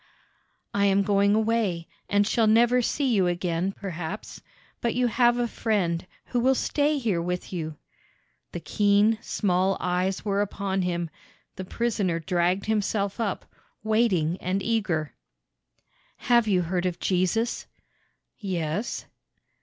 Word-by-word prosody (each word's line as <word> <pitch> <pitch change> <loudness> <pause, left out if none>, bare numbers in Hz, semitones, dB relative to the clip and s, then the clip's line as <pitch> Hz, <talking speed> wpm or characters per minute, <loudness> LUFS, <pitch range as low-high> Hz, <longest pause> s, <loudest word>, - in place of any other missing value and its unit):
"I 200 0 +2
am 200 0 +3
going 200 0 +3
away, 220 -6 0 0.2
and 205 0 +3
shall 220 +1 +2
never 240 +3 +4
see 260 +1 0
you 190 -4 +3
again, 175 +1 -1
perhaps; 190 0 -6 0.4
but 235 -1 0
you 250 0 +2
have 240 +1 +3
a 240 -1 +1
Friend 180 -7 -1 0.2
who 245 - -1
will 260 +2 +3
stay 295 +3 +1
here 215 -10 0
with 180 +2 -4
you." 160 -3 -4 0.7
The 175 - -6
keen, 205 +3 +3
small 190 -1 +1
eyes 180 +2 -1
were 200 -1 +1
upon 195 -1 -2
him. 175 -2 -2 0.4
The 185 - -6
prisoner 205 -5 -1
dragged 180 +3 0
himself 205 -1 -1
up, 210 -5 -2 0.4
waiting 200 -7 +1
and 185 +2 -1
eager. 190 -10 -1 1.0
"Have 235 -2 +3
you 185 -4 +2
heard 180 +1 -1
of 175 -1 -3
Jesus?" 190 +6 0 0.7
"Yes." 185 +1 -3
200 Hz, 130 wpm, -26 LUFS, 180-225 Hz, 1.0 s, never